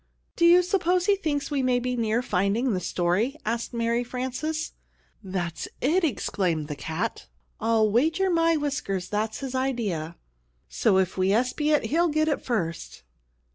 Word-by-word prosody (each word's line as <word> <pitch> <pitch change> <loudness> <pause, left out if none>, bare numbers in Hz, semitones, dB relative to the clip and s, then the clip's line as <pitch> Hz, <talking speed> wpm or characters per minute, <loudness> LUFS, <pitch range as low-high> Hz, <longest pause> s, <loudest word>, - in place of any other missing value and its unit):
"Do 340 - +3
you 355 +1 +7
suppose 360 0 +1
he 405 -1 +4
thinks 300 -7 -2
we 280 -2 +1
may 255 -1 +2
be 250 0 -1
near 230 +1 0
finding 210 +5 +1
the 185 - 0
story?" 180 - 0
asked 230 +2 -2
Mary 235 0 0
Frances. 260 +6 -3 0.5
"That's 180 -4 -4
it!" 340 +8 +2
exclaimed 180 - -1
the 150 - -3
cat. 160 - -4 0.3
"I'll 225 -1 +3
wager 320 - +2
my 330 -1 +3
whiskers 235 -11 -2
that's 215 +3 -2
his 265 -2 -4
idea. 220 -12 -2 0.5
So - - +2
that 190 - +5
if 185 +1 -7
we 185 +1 +3
espy 250 +7 +1
it 300 -1 +3
he'll 340 +3 +3
get 310 +1 +1
it 300 - 0
first." 175 -10 -3
245 Hz, 165 wpm, -26 LUFS, 195-300 Hz, 0.5 s, you